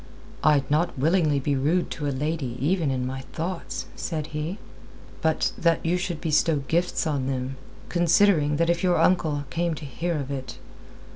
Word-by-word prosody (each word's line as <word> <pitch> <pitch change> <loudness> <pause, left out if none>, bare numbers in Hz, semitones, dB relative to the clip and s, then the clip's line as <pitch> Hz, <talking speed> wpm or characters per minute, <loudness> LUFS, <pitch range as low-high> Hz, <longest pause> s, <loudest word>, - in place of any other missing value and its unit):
"I'd 145 -3 +4
not 155 +1 +1
willingly 155 0 +3
be 140 +1 0
rude 155 +7 +1
to 150 -2 -3
a - - +1
lady 140 -2 -2
even 160 +2 +1
in 130 -1 -1
my 130 +1 -4
thoughts," 155 -7 -4
said 155 -3 -3
he. 155 +6 -3 0.6
"But 160 -2 +1
that 165 -1 +2
you 170 +2 +2
should 175 -3 -3
bestow 160 0 +2
gifts 175 +1 +1
on 140 -4 -1
them, 130 0 -3 0.3
considering 170 -3 +3
that 170 +2 +2
if 170 - -1
your 180 -2 +3
uncle 160 -4 +2
came 170 +3 0
to 150 - -8
hear 165 +5 -2
of 140 -1 -4
it...." 130 -2 -5
155 Hz, 170 wpm, -25 LUFS, 140-170 Hz, 0.6 s, I'd